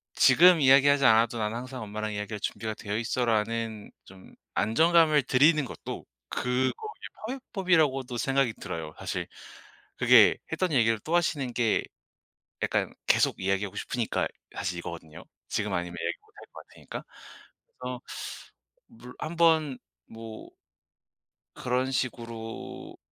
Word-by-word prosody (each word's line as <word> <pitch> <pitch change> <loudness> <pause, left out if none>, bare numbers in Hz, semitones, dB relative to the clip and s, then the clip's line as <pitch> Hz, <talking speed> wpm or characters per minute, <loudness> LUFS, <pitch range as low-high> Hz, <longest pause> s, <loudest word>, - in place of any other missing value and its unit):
"지금 175 -2 +6
이야기하지 140 +1 +6
않아도 115 +1 +4
난 105 0 -1
항상 130 +2 -6
엄마랑 110 +1 -4
이야기할 105 +1 -4
준비가 110 +1 -3
되어있어."라는 110 0 -2
좀 95 0 -15 0.2
안정감을 160 +4 +4
드리는 150 +4 +4
것도 - - -7 0.2
그거의 125 +1 0 0.6
파훼법이라고도 165 - 0
생각이 135 -1 +1
들어요. 80 -5 -6
사실 - - -4 0.7
그게 - - +6
했던 185 -3 0
얘기를 115 -3 +3
또 160 +10 -2
하시는 145 -7 -1
게 115 -3 +1 0.8
약간 - - 0
계속 - - +3
이야기하고 95 +1 -1
싶으니까 120 -3 -1 0.3
사실 90 -1 -3
이거거든요. 85 -2 -9 0.2
지금 - - -1
아니면 90 0 -3
얘기 85 0 -2
못 - - -29
할 - - -13
거 - - -10
같으니까. - - -9 0.8
그래서 125 0 -5 0.9
물 125 - -13
한번 160 -4 +2 0.3
뭐 115 -1 -10 1.1
그런 125 +1 -1
식으로 115 -3 -5
120 Hz, 300 characters per minute, -28 LUFS, 110-140 Hz, 1.1 s, 지금